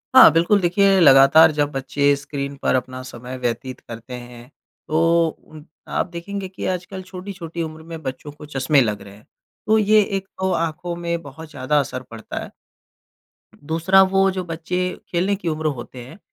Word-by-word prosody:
हाँ। 260 - +10
बिल्कुल 175 +5 +3
देखिए, 195 +2 +3
लगातार 145 +2 +7
जब 145 -1 +2
बच्चे 140 +1 +1
स्क्रीन 140 0 -5
पर - - +2
अपना 130 0 -3
समय 125 0 -8
व्यतीत 125 +1 -3
करते 115 +2 -10
हैं। 120 0 -10 0.4
तो 165 +1 +3
उन 155 -1 -14 0.2
आप - - -1
देखेंगे 190 +3 -6
कि 185 0 -7
आजकल 185 +1 -4
छोटी-छोटी 180 -3 -7
उम्र 160 0 -8
में 165 -1 -6
बच्चों 135 +2 -6
को 150 +1 -12
चश्मे 140 0 +2
लग 105 -3 -1
रहे 100 0 -12
हैं। 105 - -20 0.4
तो 220 - +4
ये 215 0 +5
एक 195 -1 -4
तो 190 0 0
आँखों 170 +1 -2
में 170 0 -3
बहुत 155 +2 -11
ज़्यादा 145 +1 0
असर 130 -2 -4
पड़ता 115 -1 -6
है। - - -10 1.0
दूसरा 165 +6 +3
वो 195 0 +4
जो 185 -1 -4
बच्चे 165 +1 -4 0.3
खेलने 185 +3 0
की 190 -3 -7
उम्र 155 -1 -1
होते 125 +1 -9
हैं, 135 - -13
160 Hz, 175 wpm, -21 LUFS, 135-180 Hz, 1.0 s, हाँ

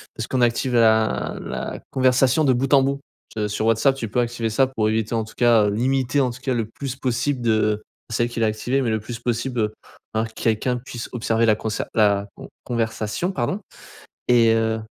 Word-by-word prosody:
parce 115 - -4
qu'on 130 - 0
active 120 +1 +1
la 110 -1 +3
la - - -5
conversation 130 +3 +3
de 130 -3 +4
bout 130 +3 -1
en 135 - +5
bout. 140 +1 -1 0.4
Se 105 -1 -1
sur 105 +1 -2
WhatsApp 115 +5 +3
tu 120 -4 -4
peux 125 - 0
activer 120 -1 -1
ça 130 +5 +3
pour 110 -5 -1
éviter 110 +1 -1
en 110 - 0
tout 110 - -12
cas, 120 -3 +4
heu, 100 - +1
limiter 130 +4 +1
en 130 - +2
tout 120 +1 -9
cas 130 -1 -1
le 115 -2 -1
plus 130 +3 -6
possible 130 +1 -1
de 110 -2 +1 0.3
c'est 115 - +1
elle 120 - -1
qui 120 - -5
l'a 110 - +3
activée, 120 +5 -1
mais 120 - 0
le 110 - 0
plus 115 +2 -7
possible, 120 +1 -2
heu, 105 0 -1 0.4
un 110 +1 0
quelqu'un 115 +2 -1
puisse 120 -2 -7
observer 115 -1 +1
la 110 - +5
conser 110 0 -3
la 100 -2 +3
con - - -11 0.2
conversation 115 - -2
pardon. 195 +1 -2 0.7
Et 115 -2 +5
heu, 110 0 +1
115 Hz, 215 wpm, -22 LUFS, 110-130 Hz, 0.7 s, en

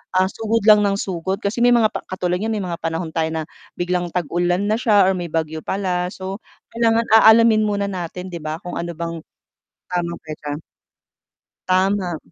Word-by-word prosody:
ah, 185 +1 +3
sugod 225 +2 -1
lang 210 -1 +7
ng 200 - +2
sugod. 190 +1 -3
Kasi 200 +4 -2
may 245 0 +5
mga 225 -3 +4
pa - - -5
katulad 180 -1 -2
niyan, 220 +3 -2
may 210 - -2
mga 170 - -3
panahon 165 0 -3
tayo 160 -1 0
na 160 -1 -2 0.3
biglang 175 -1 -2
tag-ulan 175 +3 0
na 215 - +2
siya, 210 -5 +4
or 190 - 0
may 175 -1 -4
bagyo 160 -1 -1
pala. 180 -2 -1
So, 190 +1 -6 0.3
kailangan 230 0 +2
aalamin 220 -1 +6
muna 200 -1 -1
natin, 180 0 -5
'di 175 - -6
ba, 155 +2 -5
kung 175 - -6
ano 170 0 -4
bang, 165 0 -5 0.7
tamang 175 -1 -2
petsa. 150 -1 -6 1.1
Tama. 185 -2 +1
185 Hz, 180 wpm, -21 LUFS, 170-205 Hz, 1.1 s, lang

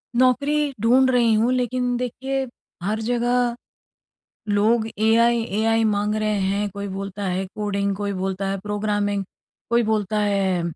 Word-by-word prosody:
नौकरी 280 +4 +2
ढूँढ़ 255 +3 +4
रही 240 -3 +3
हूँ, 225 +3 +2
लेकिन 250 0 0
देखिए 265 +2 -3 0.4
हर 210 +3 -1
जगह, 240 +1 +1 0.9
लोग 220 +2 +2
एआई 230 +2 +3 0.2
एआई 225 +1 +2
माँग 210 0 +1
रहे 215 -1 0
हैं, 200 +2 0
कोई 200 +1 -6
बोलता 195 +1 -5
है 185 +1 -1
कोडिंग, 200 -1 -1
कोई 200 0 -3
बोलता 190 +1 -2
है, 195 0 -1
प्रोग्रामिंग 205 0 -1 0.5
कोई 235 0 +3
बोलता 215 -1 0
है 195 -3 +1
215 Hz, 140 wpm, -22 LUFS, 200-240 Hz, 0.9 s, ढूँढ़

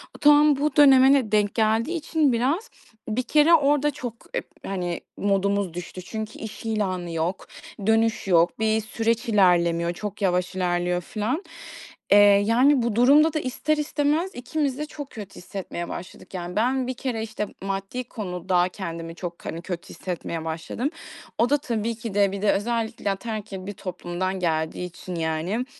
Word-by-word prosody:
Bu - - -12
tam 295 0 +6
bu 290 0 0
döneme 270 -2 +7
de 255 -7 +2
denk 210 -1 +2
geldiği 225 +8 +1
için 310 -3 +1
biraz, 285 - 0 0.4
bir 245 +4 0
kere 305 +5 +4
orada 295 -1 +4
çok 250 -5 -6 0.2
ep - - -3 0.2
hani, 180 -3 -3 0.2
modumuz 200 -2 +1
düştü 180 +1 -7
çünkü 220 +3 -6
iş 220 +1 -8
ilanı 185 -6 -1
yok, 165 +3 -2 0.4
dönüş 225 -1 +2
yok, 175 +2 +3
bir 220 0 +2
süreç 230 +1 -1
ilerlemiyor, 170 -4 +3
çok 210 +2 -6
yavaş 180 -1 0
ilerliyor, 175 -1 0
filan. 225 - -2 0.7
Eee, 205 - +8
yani 230 +7 +5
bu 230 -2 -1
durumda 290 +6 +5
da 310 - 0
ister 300 +3 -1
istemez 300 +4 0
ikimiz 275 +1 -2
de 300 - -3
çok 290 -2 -8
kötü 205 -4 -9
hissetmeye 180 -2 -6
başladık. 180 - -9
Yani, 180 0 -5
ben 255 +3 +1
bir 255 - -2
kere, 245 -3 -3
işte, 215 -2 -4 0.2
maddi 195 +6 -3
konuda 180 -5 -1
kendimi 165 -3 -6
çok, 175 -1 -7
hani, 165 - -4
kötü 175 0 -6
hissetmeye 170 -2 -5
başladım. 165 - -3 0.5
O 240 +2 +3
da 290 - +4
tabii 230 -5 -2
ki 225 -2 -6
de 200 -1 +3
bir 200 0 -5
de 210 - +4
özellikle 225 -1 -1
ataerkil 205 -2 -5
bir 205 - -5
toplumdan 185 0 -4
geldiği 160 0 -1
için, 180 +1 -8
yani, 165 +8 -1
215 Hz, 165 wpm, -24 LUFS, 180-255 Hz, 0.7 s, Eee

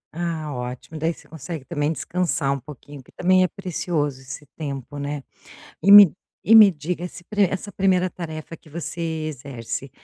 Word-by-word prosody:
Ah, 165 -4 -3
ótimo. 125 +5 -6
Daí, 165 +2 +1
você - - -13
consegue 160 -2 -7
também 150 -2 -1
descansar 165 -4 -1
um 140 - -3
pouquinho. 145 0 -12
Que - - -21
também 185 +1 +3
é - - +3
precioso 160 -8 -3
esse 135 +3 -9
tempo, 145 -2 -6
né. 145 -1 -4 0.6
E 200 - +4
me 200 -5 +10 0.3
e 225 - +5
me 215 -3 +10
diga 170 +2 -4
esse 180 0 -8 0.3
essa 195 +2 -4
1° 185 -1 +2
tarefa 165 -2 -7
que 155 - -20
você 170 +1 -6 0.3
exerce. 135 -2 -6
155 Hz, 165 wpm, -23 LUFS, 140-180 Hz, 0.6 s, me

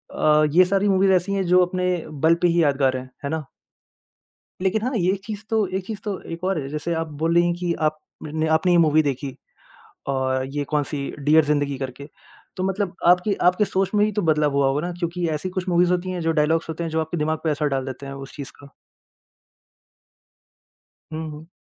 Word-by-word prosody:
अ, 150 0 +4
ये 180 +4 +6
सारी 195 +2 +1
मूवीज़ 190 0 +4
ऐसी 185 +2 +1
है 195 -1 0
जो 180 0 +4
अपने 180 0 -2 0.2
बल 160 +3 +2
पे 175 - +4
ही 170 0 +3
यादगार 135 -3 +2
हैं। 130 0 -8 0.2
है - - -1
ना? 160 -1 -3 1.2
लेकिन 200 +3 +1
हाँ, 250 +3 -1
ये 185 -1 +2
चीज़ 215 -1 -6
तो 220 -2 +2
ये 190 - 0
चीज़ 200 +2 -7
तो 205 -3 -3
एक 165 +2 -6
और 190 -2 0
है, 135 - -6
जैसे 155 +4 -3
आप 165 0 -2 0.2
बोल 165 +1 +2
रही 175 0 +5
हैं 175 - +1
कि 175 -1 -1
आप 155 0 +1 0.5
आपने 160 +3 +3
ये 175 - +5
मूवी 155 -1 +4
देखी। 140 -2 -3 0.7
और 130 -1 0
ये 145 - 0
कौन-सी? 145 -1 -2
डियर 150 +2 +5
ज़िंदगी 145 -2 0
करके। 135 +2 -6 0.5
तो 185 - -3
मतलब 195 -1 -1
आपकी 180 +4 +4
आपकी 180 +4 +2
सोच 190 -1 0
में 205 0 +4
ही 215 - 0
तो - - +2
बदलाव 150 -3 +2
हुआ 140 0 +2
होगा 135 +2 0
ना 180 - -4
क्योंकि 175 0 -2
ऐसी 155 +3 -2
कुछ 185 0 -4
मूवीज़ 175 0 +3
होती 180 +1 -1
हैं, 180 -1 -3
जो 165 0 +1
डायलॉग्स 160 +1 +1
होते 160 +1 -4
हैं, 165 - -3
जो 160 0 0
आपके 160 +2 -3
दिमाग 155 0 0
पर 160 - +2
असर 150 0 0
डाल 135 -2 -1
देते 130 +1 -7
है 135 - -6
उस 135 +1 -10
चीज़ 140 -2 -7
का। 140 - -13 2.4
हुँ, 160 0 -4
हुँ। 150 +2 -11
165 Hz, 215 wpm, -23 LUFS, 150-180 Hz, 2.4 s, ये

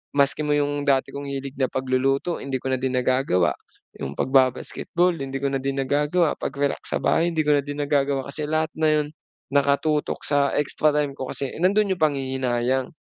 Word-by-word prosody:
Maski 140 0 +2
mo 145 - +3
'yong 145 0 -1
dati 135 -1 +2
kong 140 0 -6
hilig 140 0 -5
na 130 - +3
pagluluto 130 +6 0
hindi 135 -1 -4
ko 130 +1 -2
na 130 - 0
din 130 0 -1
nagagawa, 125 - +2 0.5
'yong 70 +1 -5
pagba-basketball 135 +6 +1
hindi 135 0 -5
ko 140 0 -1
na 135 - 0
din 135 0 -1
nagagawa, 150 +4 +1
pag-relax 140 +1 -2
sa - - 0
bahay 165 - +3
hindi 160 -2 0
ko 150 -1 +3
na - - -3
din 145 +1 -3
nagagawa. 140 -1 +1
Kasi 150 +1 -4
lahat 155 +1 0
na 155 - +3
'yon 150 -1 +2 0.4
nakatutok 145 +2 +1
sa 145 -1 +1
extra 150 +1 +1
time 145 -1 +1
ko 135 -1 -6
kasi 135 -2 -4
nandoon 200 +3 +3
'yong - - -16
panghihinayang. 130 -3 0
140 Hz, 190 wpm, -24 LUFS, 130-150 Hz, 0.5 s, mo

